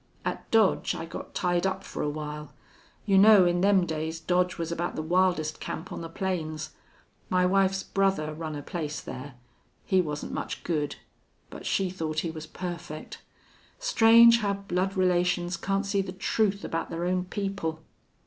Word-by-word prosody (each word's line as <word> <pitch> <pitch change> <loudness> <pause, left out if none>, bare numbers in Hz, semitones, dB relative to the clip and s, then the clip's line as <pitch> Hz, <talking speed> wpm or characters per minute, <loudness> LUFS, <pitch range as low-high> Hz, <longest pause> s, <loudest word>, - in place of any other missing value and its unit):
At - - -4
Dodge 220 -4 +3
I 165 - -5
got 165 - -9
tied 175 0 +1
up 190 0 -3
for - - -6
a 150 - 0
while. 150 -1 -6 0.5
You 195 -2 +5
know, 205 -2 +8
in 175 0 +2
them 195 -2 +4
days 160 0 -3
Dodge 180 +2 +1
was 165 0 -3
about 170 +1 -2
the 155 - -3
wildest 175 -2 +1
camp 160 +4 -6
on - - -5
the 165 - -6
plains. 165 -4 -3 0.6
My 180 0 +3
wife's 190 0 +2
brother 195 -6 0
run 155 -1 -5
a 145 - -6
place 155 -3 -4
there. 130 +1 -8 0.5
He 190 -1 +3
wasn't 150 -3 -4
much - - -4
good. 150 -4 -1 0.6
But - - -8
she 190 -2 +1
thought 155 -4 -2
he 165 - -3
was 160 -1 -8
perfect. 170 -3 -7 0.6
Strange 235 - +6
how 205 -3 0
blood 195 0 -2
relations 180 -1 +2
can't 195 +3 -1
see 200 0 +1
the 185 -1 -6
truth 200 +1 0
about 165 - -3
their 170 +1 -3
own 180 0 0
people! 185 -5 -3
180 Hz, 170 wpm, -27 LUFS, 160-195 Hz, 0.6 s, know